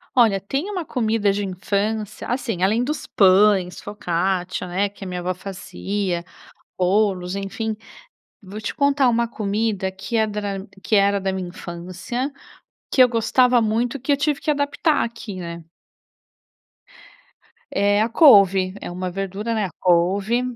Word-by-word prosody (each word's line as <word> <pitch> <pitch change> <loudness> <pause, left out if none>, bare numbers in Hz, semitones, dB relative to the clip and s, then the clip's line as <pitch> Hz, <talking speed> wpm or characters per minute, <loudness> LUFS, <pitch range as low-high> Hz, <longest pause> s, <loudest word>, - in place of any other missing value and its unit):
Olha, 225 -6 +4
tem 275 - -3
uma 370 -4 -3
comida 220 -6 +1
de 200 +1 -2
infância 205 +3 -2
assim, 230 -7 -2
além 220 +5 +2
dos 300 +4 -3
pães, 190 -1 +4
focaccia, 185 -2 -2
né, 190 +3 0
que 200 0 -13
é - - -6
minha 180 -1 -4
avó 180 +1 -2
fazia, 190 -1 -4 0.5
bolos, 185 -1 +1
enfim. 215 +3 -3 0.7
Vou 200 +1 -8
te 215 - -4
contar 280 -2 +3
uma 235 0 +1
comida 210 -3 -1
que 190 +5 -4
é 220 - +3
dra 205 -2 -4 0.2
que 220 - +1
era 200 0 +3
da 190 0 -1
minha 190 -2 -4
infância, 185 +10 -5 0.6
que 260 - +5
eu 250 - +8
gostava 240 +2 +3
muito 225 +4 0
e - - -16
que 270 +4 -2
eu 280 - +4
tive 295 0 0
que 305 - +1
adaptar 290 +2 +1
aqui, 230 -3 -6
né. 170 -1 -7 2.1
É 205 +1 +2
a 225 - +1
couve, 195 - +6
é - - -6
uma 180 +1 -4
verdura, 195 +4 -3
né. 215 -2 0
A - - -4
couve, 190 +6 +2
205 Hz, 155 wpm, -22 LUFS, 185-230 Hz, 2.1 s, eu